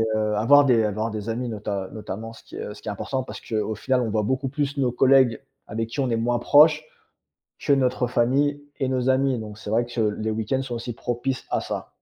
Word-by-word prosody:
heu, 105 -1 0
à 110 - 0
voir 145 +2 +7
des 120 -5 +4
à 105 - 0
voir 110 +2 -2
des 110 0 -5
amis, 120 +2 -2
nota 100 -3 -4
notamment, 110 +1 -6
ce 115 - -15
qui - - -12
est, - - -5
heu, 105 - -6
ce - - -14
qui - - -13
est - - -1
important 130 +6 -3
parce - - -9
qu'au 110 -1 -2
final, 130 +4 0
on 115 -3 -1
voit 105 0 0
beaucoup 130 +4 -1
plus 140 +1 -2
nos 125 -3 +1
collègues 130 -2 +4 0.3
avec 115 +1 -3
qui 140 - -6
on 130 -2 +1
est 115 - +1
moins 120 +1 0
proche 150 +4 +5 0.7
que 140 - +2
notre 130 -2 +2
famille 135 +4 +1 0.2
et 135 - 0
nos 130 0 0
amis. 130 -2 +2
Donc, 105 -1 -8
c'est 110 - -8
vrai 120 +2 +2
que 120 -1 -3
les 110 0 -1
week-ends 110 +5 -1
sont 125 -3 -5
aussi 120 0 -5
propices 120 +3 -3
à - - 0
ça. - - -5
120 Hz, 250 wpm, -24 LUFS, 110-130 Hz, 0.7 s, voir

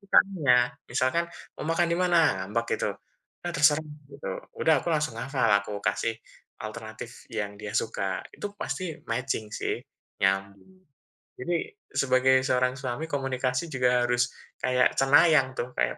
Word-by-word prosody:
kesukaannya. 185 -10 +4 0.3
Misalkan, 130 +7 +1 0.3
mau - - -6
makan 170 +1 +2
dimana? 175 0 +3 0.3
Ngambek 115 +4 -1
gitu, - - 0 0.5
udah 175 - -3
terserah, 150 +1 +4 0.3
gitu. 140 - -6 0.3
Udah, 160 - +5
aku - - -4
langsung 150 -6 -1
hafal, 130 -3 0
aku 100 0 -6
kasih 115 - 0 0.5
alternatif 110 +1 -8
yang 105 -2 -3
dia 105 -1 -6
suka. 95 -4 -1
Itu 205 0 -6
pasti 180 -5 -3
matching 115 -1 -1
sih, - - -1 0.5
nyambung. 100 - -1 0.5
Jadi 175 +7 -2 0.4
sebagai 130 0 +3
seorang 125 0 +2
suami 130 +3 -3
komunikasi 130 0 -1
juga 125 -2 +3
harus 120 0 +2 0.3
kayak 125 0 +3
cenayang 135 0 +5
tuh, 125 - -1
kayak, - - +1
130 Hz, 135 wpm, -27 LUFS, 115-155 Hz, 0.5 s, Udah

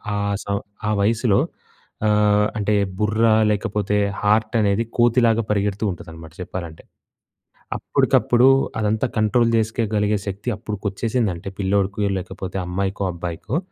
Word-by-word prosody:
ఆ - - -1 0.3
సం 100 0 -1 0.3
ఆ - - +1
వయసులో 110 0 +2 0.7
ఆహ్, 105 0 +3
అంటే 105 0 0 0.3
బుర్ర 110 +2 +2 0.2
లేకపోతే, 105 -1 0 0.2
హార్టనేది 105 0 +2
కోతిలాగా 120 -1 +4
పరిగెడుతూ 105 0 0
ఉంటదనమాట 80 -2 -10
చెప్పాలంటే. 85 -3 -7 0.9
అప్పటికప్పుడు 120 +1 +3 0.3
అదంతా 110 +3 +1
కంట్రోల్ 115 +2 +3
చేసుకోగలిగే 105 -2 0
శక్తి 100 +4 -5
అప్పడుకొచ్చేసిందంటే 105 -2 -2
పిల్లోడికి, 100 +1 0
లేకపోతే 95 0 -6
అమ్మాయికో, 95 +2 -2
అబ్బాయికో, 85 - -4
105 Hz, 100 wpm, -22 LUFS, 95-110 Hz, 0.9 s, కోతిలాగా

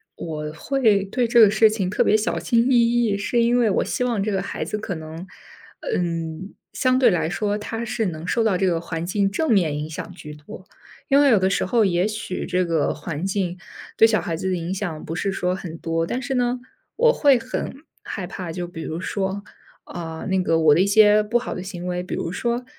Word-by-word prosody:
我 150 -2 -5
会 220 - +2
对 235 +5 -1
这 235 +1 +4
个 210 -3 +8
事 220 0 +5
情 200 -4 -2
特 210 - +2
别 215 - +4
小 220 - -1
心 240 +1 +2
翼 - - +5 0.3
翼， 205 -3 +1
是 235 +4 0
因 240 +1 +3
为 225 -3 +3
我 - - +1
希 250 - -2
望 230 -5 0
这 215 - -1
个 195 0 0
孩 - - -4
子 210 - -3
可 195 -4 -4
能 160 +3 -8 0.7
嗯， 165 +1 -3 0.2
相 255 0 +2
对 245 -5 +5
来 160 -2 0
说 205 +2 -1
他 225 +2 -5
是 230 -3 -1
能 160 -1 -6
受 230 +5 +1
到 200 -5 +2
这 190 - +1
个 170 -2 +1
环 165 -1 -4
境 195 +1 +1
正 310 +7 -1
面 165 -8 +2
影 150 +1 -4
响 160 - -7
居 150 -4 -10
多。 150 +5 -12 0.4
因 275 0 +4
为 285 - +5
有 220 - +5
的 190 0 +2
时 195 - 0
候， 220 +2 +2
也 180 +1 +1
许 215 -3 -4
这 180 0 +1
个 165 -3 0
环 155 +3 -5
境 185 -2 -2 0.4
对 225 - +7
小 215 -1 +1
孩 165 - -3
子 190 +3 -3
的 185 - 0
影 170 +2 -3
响 180 -6 -4
不 165 - -5
是 195 +2 -1
说 180 -1 -1
很 170 -3 -6
多， 165 0 -2
但 255 - -2
是 270 0 -3
呢， 245 0 0 0.4
我 480 +1 +4
会 280 -4 +4
很 255 +2 -4 0.3
害 190 - -5
怕， 180 -1 -7
就 180 -1 -4
比 170 -2 -8
如 160 +1 -4
说， 195 +1 -3 0.4
呃， 165 -2 -6
那 190 -1 +2
个 165 -2 +2
我 155 -2 +5
的 165 - +3
一 195 - +3
些 210 0 +6
不 220 +3 +1
好 240 - -4
的 180 - -5
行 180 -2 -7
为， 180 0 -2
比 180 - -5
如 165 - -3
说， 235 +5 -2
190 Hz, 255 characters per minute, -22 LUFS, 170-225 Hz, 0.7 s, 个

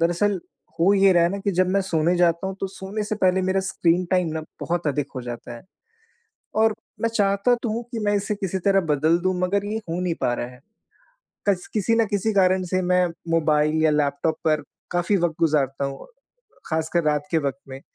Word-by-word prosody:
दरअसल, 175 +3 +1 0.4
हो 190 +4 +5
ये 195 -1 +5
रहा 175 -1 +4
है 170 - +4
ना 200 - -3
कि 200 +1 -1
जब 185 0 +4
मैं 195 +1 +2
सोने 165 +2 +2
जाता 175 +1 +2
हूँ, 190 - -3
तो - - -1
सोने 190 +2 -5
से 215 - -2
पहले 185 -1 +2
मेरा 190 +1 +1
स्क्रीन 180 -1 +1
टाइम 180 -2 +2
ना, 160 - -2 0.2
बहुत 170 +2 -2
अधिक 145 -1 0
हो 130 - -4
जाता 120 0 -7
है। 115 - -13 1.0
और 220 -1 +3 0.3
मैं 230 - +2
चाहता 200 +3 +3
तो 235 - -1
हूँ 235 - -2
कि 235 - -3
मैं 205 0 +2
इसे 200 +1 -1
किसी 195 -2 -3
तरह 195 -1 +4
बदल 155 +3 +3
दूँ, 185 0 +1
मगर 195 +2 +1
ये 210 +1 -2
हो 170 +2 -2
नहीं 180 -2 -1
पा 120 - +1
रहा 120 - -3
है। 125 0 -14 0.9
कस 190 -3 +1
किसी 225 +2 +2
न 230 -1 +3
किसी 205 +1 0
कारण 185 -1 +3
से, 185 +1 -1
मैं 180 0 +3 0.2
मोबाइल 155 -1 +2
या 155 - +4
लैपटॉप 150 +1 0
पर 155 -1 +2 0.3
काफ़ी 175 +3 +1
वक़्त 170 -3 0
गुज़ारता 140 -4 +1
हूँ, 135 0 -6 0.6
ख़ासकर 160 +2 0
रात 150 -1 +1
के 165 - +3
वक़्त 140 -2 -3
में। 135 0 -8
180 Hz, 215 wpm, -23 LUFS, 155-195 Hz, 1.0 s, हो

